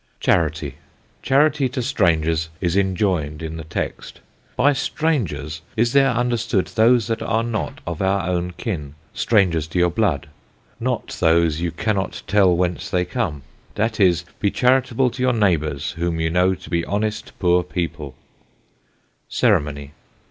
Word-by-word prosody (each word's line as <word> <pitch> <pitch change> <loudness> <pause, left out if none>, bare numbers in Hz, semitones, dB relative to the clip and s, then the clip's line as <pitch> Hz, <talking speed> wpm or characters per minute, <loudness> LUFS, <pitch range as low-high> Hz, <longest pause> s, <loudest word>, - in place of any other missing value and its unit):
CHARITY. 75 -4 0 0.4
Charity 140 0 +3
to 125 +1 -3
Strangers 80 - +1
is 90 -1 0
enjoin'd 90 -6 0
in 80 0 -5
the 80 - -6
Text. 80 +2 -5 0.4
By 145 - +4
Strangers 110 - -2 0.2
is 115 +2 +2
there 135 -1 +5
understood 120 -5 0
those 115 +1 +4
that 115 -1 -2
are 115 +1 0
not 115 -2 -3
of 85 -2 -4
our 95 -2 +1
own 90 0 -1
Kin, 75 - -4 0.2
Strangers 90 -8 +2
to 80 - -5
your 90 0 +3
Blood; 90 -9 0 0.5
not - - -2
those 80 -1 +3
you 85 - 0
cannot 95 +4 -2
tell 95 -4 +4
whence 90 -1 -1
they 90 -1 +1
come; 90 - -3 0.3
that 110 +2 -1
is, 90 -3 +3
be 100 - +2
charitable 125 +1 +2
to 125 - -7
your 130 0 +3
Neighbours 80 - 0
whom 85 -1 -2
you 80 0 0
know 90 +2 +3
to - - -13
be 85 -1 +1
honest 105 +1 -3
poor 90 -1 +3
People. 85 -6 -4 1.1
CEREMONY. 70 -1 +1
90 Hz, 150 wpm, -21 LUFS, 80-115 Hz, 1.1 s, there